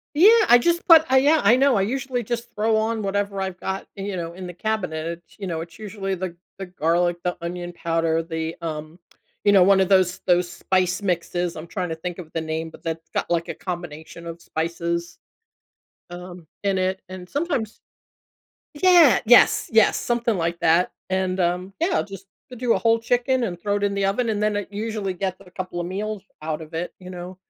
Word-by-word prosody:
Yeah, 425 +6 +7
I 240 - +9
just 340 +7 +1
put 325 -2 +8
I 265 - +5
yeah, 295 +3 +4
I 225 +5 +6
know, 270 0 +4
I 195 - +2
usually 250 +2 -2
just 235 +1 -4
throw 220 +1 +2
on 220 0 -1
whatever 200 0 -1
I've 190 -1 -4
got, 190 0 -4
you 195 -1 -4
know, 170 -1 -4
in 185 0 -8
the 175 - -7
cabinet. 180 -6 -2
It's, 170 +1 -7
you 200 - -6
know, 165 -2 -3
it's 170 0 -10
usually 200 -2 -4
the 180 -1 -5 0.2
the 195 - -5
garlic, 175 0 +1
the 180 0 -1
onion 175 +1 -5
powder, 165 -1 0
the, 160 0 -4
um, 155 +1 -6 0.5
you 205 - +6
know, 190 -2 +7
one 195 +1 +5
of 190 - +3
those 185 -2 +3
those 180 -1 +3
spice 185 0 0
mixes. 175 -1 -1
I'm 155 +2 -8
trying 180 +1 -3
to 160 - -3
think 175 +2 -6
of 165 -3 -10
the 165 - -1
name, 160 +1 -3
but - - -15
that's 165 -1 -5
got, - - -2
like, 170 -1 0
a - - -2
combination 170 -2 -7
of 165 0 -8
spices, 170 +1 -3 0.9
um, 175 -1 -9 0.2
in 195 -1 +1
it. 185 +1 -1
And 185 -1 -8
sometimes 280 -8 -2 1.0
Yeah, 330 - +6
yes, 245 +2 +6
yes, 225 -1 +5
something 235 -2 0
like 170 0 -2
that, 170 +3 +3 0.2
and, 190 0 0
um, 180 +2 0
yeah, 335 - +2
I'll - - +1
just 195 -1 -10 0.3
do 240 0 +1
a - - +1
whole 230 0 +3
chicken 245 +2 +1
and 175 -6 -4
throw 205 +1 0
it 205 - -3
in 200 - 0
the 200 -1 +1
oven, 225 +5 0
and 210 -2 0
then 210 -1 +1
it 205 0 -4
usually 210 -2 -3
gets 185 +1 -3
a 180 - -17
couple 180 -1 -5
of 170 - -3
meals 205 +1 -4 0.2
out 155 0 -3
of 155 - -12
it, 170 +2 -4
you 185 0 -10
know, 180 0 -8
185 Hz, 210 wpm, -23 LUFS, 170-215 Hz, 1.0 s, I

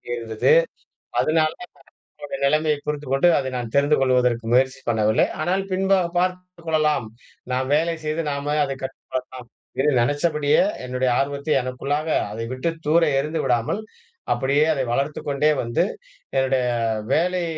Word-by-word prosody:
இருந்தது. 115 -2 0 0.7
அதுனால 155 0 +2 0.5
என்னோட 290 -1 -10
நிலைமையைப் 150 0 +1
புரிந்துக்கொண்டு, 145 +1 +1
அதை 130 - -2
நான் 120 -2 -5
தெரிந்து 145 +2 +4
கொள்வதற்கு 125 -3 +2
முயற்சி 130 +1 +2
பண்ணவில்லை. 110 -2 +2
ஆனால் 185 +5 0
பின்பாகப் 185 -2 +1
பார்த்துக் 180 -1 -3
கொள்ளலாம், 155 -6 +1 0.5
நாம் 130 +1 -1
வேலை 165 +2 +1
செய்து 155 +2 -1
நாமே 140 +1 -2
அதைக் 135 -1 -5
கற்றுக் 135 0 -7
கொள்ளலாம் 130 -1 -5 0.3
என்று 145 +2 +3
நெனச்சபடியே, 145 - +2 0.2
என்னுடைய 125 0 0
ஆர்வத்தை 140 +2 -1
எனக்குள்ளாக 140 +5 -3 0.2
அதை 115 +2 -4
விட்டுத் 165 +5 -3
தூர 165 +3 +4 0.2
எறிந்து 155 +3 -2
விடாமல், 120 - 0 0.5
அப்படியே 140 +4 +2
அதை 135 -2 -1
வளர்த்துக் 140 +4 -2
கொண்டே 145 +2 +2
வந்து, 115 +5 0 0.5
என்னுடைய 135 -1 +2 0.5
வேலை 180 +3 +1
145 Hz, 135 wpm, -22 LUFS, 130-155 Hz, 0.7 s, தெரிந்து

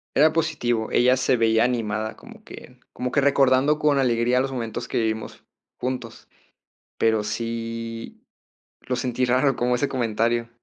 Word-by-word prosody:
Era 155 +3 +5
positivo, 120 -8 -1
ella 125 +1 +4
se 130 -1 +2
veía 115 0 +3
animada, 110 -3 -1
como - - -15
que - - -13
como 125 0 -3
que 140 - +2
recordando 140 +1 +3
con 150 -2 +2
alegría 120 0 +2
los 135 0 -2
momentos 115 -4 -4
que - - -3
vivimos 110 -1 -3 0.4
juntos. 125 -2 -5 0.7
Pero 110 -1 +2
sí, 115 +1 -5 0.6
lo 125 - -3
sentí 125 0 -1
raro 130 +1 +2
como 125 0 +1
ese 140 +3 0
comentario. 115 -1 0
120 Hz, 145 wpm, -23 LUFS, 115-130 Hz, 0.7 s, Era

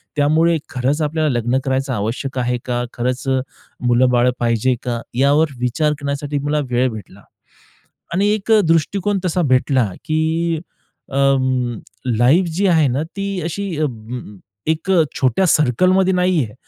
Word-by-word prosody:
त्यामुळे 160 +3 +3
खरंच 130 +4 -1
आपल्याला 155 0 0
लग्न 120 +3 0
करायचं 135 0 -1
आवश्यक 120 +5 -3
आहे 125 0 0
का, 120 -1 -1
खरंच 125 +2 -2
अ, 130 0 +2 0.5
मुलं-बाळं 125 0 +3
पाहिजे 120 +2 +1
का, 120 -2 -3
यावर 145 +4 +3
विचार 125 +5 0
करण्यासाठी 140 0 -2
मला 150 +1 0
वेळ 125 +1 +2
भेटला. 100 -2 -10 0.9
आणि 195 +4 +2
एक 215 +1 -2
अ, 220 - +7
दृष्टिकोन 185 +5 +1
तसा 180 0 0
भेटला, 130 -4 +2
की 160 +1 0 0.5
अ, 135 - -4 1.0
लाईफ 135 +11 +4
जी 200 +1 +2
आहे 160 -5 +4
ना, 135 +4 -1
ती 195 -1 -3
अशी 195 +5 -3
अं, 115 -5 -5 0.3
एक 160 +4 -4
अ, 175 -4 +5 0.2
छोट्या 130 +7 +2
सर्कलमध्ये 185 +7 +3
नाही 180 -4 +2
आहे. 105 - -12
140 Hz, 145 wpm, -19 LUFS, 125-165 Hz, 1.0 s, अ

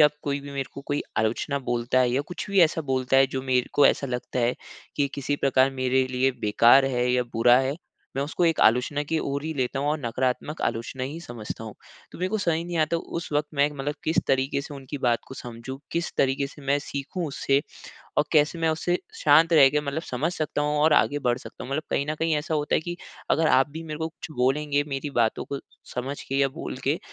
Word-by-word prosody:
अब 150 -1 +7
कोई 140 0 -2
भी 140 0 -9
मेरे 135 -1 -3
को 140 - -7
कोई 145 0 0 0.2
आलोचना 110 +6 0
बोलता 120 +1 +1
है 125 -1 +3
या 130 +3 +1
कुछ 175 - -5
भी 195 -2 +4
ऐसा 160 -1 +4
बोलता 130 0 +2
है, 135 0 +6
जो 130 0 -4
मेरे 125 -2 +1
को 145 - +6
ऐसा 140 - +2
लगता 125 0 -4
है 120 +1 +2 0.4
कि 145 -1 +2
किसी 145 +1 -2
प्रकार 135 -1 +3
मेरे 130 0 +2
लिए 130 +1 +2
बेकार 120 +5 +5
है 125 -2 +1
या 125 0 +3
बुरा 120 +2 +5
है, 135 +2 0 0.4
मैं 135 - +1
उसको 155 +5 -1
एक 165 -2 +2
आलोचना 125 +6 +3
की 160 +2 -1
ओर 140 -1 -2
ही 160 - -2
लेता 130 0 -1
हूँ 145 +1 0
और 155 - +1
नकारात्मक 130 +4 -2
आलोचना 115 +3 -2
ही 145 +5 -5
समझता 115 -7 -7
हूँ। 110 - -8 0.4
तो - - -10
मेरे 185 +1 0
को 215 +2 -1
समझ 170 -5 +1
ही 165 - -3
नहीं 175 0 -4
आता, 155 +1 +2
उस 165 0 -5
वक़्त 150 0 +1
मैं 140 0 +4
एक 150 - -5
मतलब 145 +2 -2
किस 160 - 0
तरीके 135 +1 +1
से 145 0 -8
उनकी 140 +1 -7
बात 120 -3 +2
को - - -8
समझूँ, 120 +1 -8
किस 170 0 -1
तरीके 135 +1 +2
से 145 +1 -14
मैं 140 +1 +3
सीखूँ 145 +5 -4
उससे 140 -1 +1 0.6
और 150 - +4
कैसे 155 +1 +3
मैं 165 0 +1
उससे 175 +3 0 0.2
शांत 160 +3 +5
रह 145 -4 +8
के, 150 +2 +1
मतलब 150 +2 -3
समझ 155 +4 -2
सकता 155 -3 -2
हूँ 150 0 0
और 155 +1 +5
आगे 145 -1 +3
बढ़ 125 -3 0
सकता - - -10
हूँ? - - -8
मतलब 145 +3 -1
कहीं 140 - 0
न - - -1
कहीं 165 -1 +1
ऐसा 150 +2 -2
होता 150 -1 0
है - - +3
कि 175 +2 -5 0.3
अगर 160 - +3
आप 135 +2 +4
भी 160 +3 -7
मेरे 155 -2 -6
को 160 0 -2
कुछ 160 -1 -10
बोलेंगे, 145 +3 +1
मेरी 135 +1 -3
बातों 115 -4 +1
को 140 - -4 0.4
समझ 130 +3 -4
के 135 - -6
या 140 - +4
बोल 135 - -6
के, - - +1
140 Hz, 245 wpm, -25 LUFS, 130-155 Hz, 0.6 s, रह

